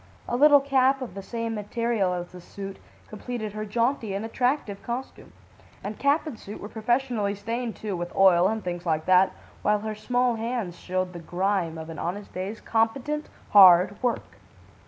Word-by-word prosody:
A - - -1
little 290 +2 +7
cap 270 -1 +3
of 245 - -8
the 195 - -6
same 230 +2 -4
material 215 -2 -1
as 175 0 -6
the 180 -1 -11
suit, 195 +2 -8 0.3
completed 215 -1 -5
her 215 0 -4
jaunty 230 -1 0
and 200 +3 -3
attractive 245 -3 -1
costume. 245 +3 -6 0.5
And 205 +1 -6
cap 285 +4 +2
and 285 -8 -7
suit 205 - -9
were 205 - -8
professionally 225 -2 0
stained, 230 +3 -4
too, 210 -3 -4
with 175 0 -5
oil 185 -2 +6
and 220 0 -2
things 175 -1 -4
like 160 -2 -1
that, 185 +1 +5 0.3
while 210 0 +2
her 215 0 -3
small 245 +2 0
hands 225 -6 -3
showed 185 0 -2
the 175 - -7
grime 175 -1 -1
of 160 0 -7
an 160 - -8
honest 200 +4 -5
day's 195 +4 -4
competent, 270 +7 -1 0.2
hard 190 -1 +7
work. 245 -2 -2
215 Hz, 175 wpm, -26 LUFS, 185-240 Hz, 0.5 s, little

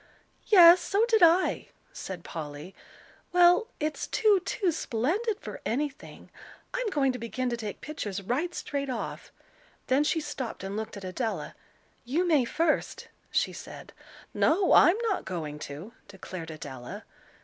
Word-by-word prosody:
"Yes, 355 -3 +9
so 405 +5 +2
did 455 -2 +2
I," 345 +2 +4 0.3
said 185 - -7
Polly. 150 +2 -7 0.6
"Well, 355 +5 +5
it's 305 0 -2
too, 425 -3 +3
too 375 -4 0
splendid 340 - -1
for - - -8
anything. 280 +4 -4 0.4
I'm - - -1
going 275 -7 +2
to 250 - -6
begin 245 +2 -3
to - - 0
take 215 -3 -6
pictures 210 -10 -5
right 255 - -2
straight 280 -1 -3
off." 245 -3 -5 0.5
Then 265 +3 +3
she 315 +2 +1
stopped 285 -9 -5
and 195 +1 -4
looked 220 0 -5
at 200 - -9
Adela. 220 +5 -3 0.5
"You 310 +9 0
may 300 -7 +4
first," 315 +5 -1 0.2
she - - 0
said. - - -10 0.4
"No, 360 +3 +3
I'm 350 +4 +7
not 430 -5 0
going 155 -5 -5
to," 160 +11 -9
declared 185 -4 -8
Adela. 135 -6 -8
275 Hz, 145 wpm, -28 LUFS, -, 0.6 s, Yes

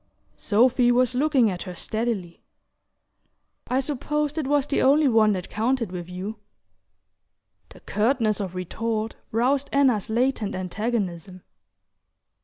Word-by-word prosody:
Sophy 245 +3 +3
was 250 +1 +2
looking 265 -2 +3
at 180 - -6
her 180 -2 -7
steadily. 215 -5 -3 1.3
"I 255 - +1
supposed 300 +2 -2
it 290 - -2
was 285 -1 +2
the 290 - 0
only 285 +3 +4
one 220 -4 +4
that 185 -1 -4
counted 230 -1 -1
with 180 -1 -6
you." 190 +4 -6 1.3
The - - -16
curtness 220 -1 0
of 190 -3 -4
retort 220 +4 -3 0.2
roused 260 +5 +1
Anna's 260 -8 +2
latent 235 -2 0
antagonism. 185 -2 -3
230 Hz, 120 wpm, -24 LUFS, 200-265 Hz, 1.3 s, only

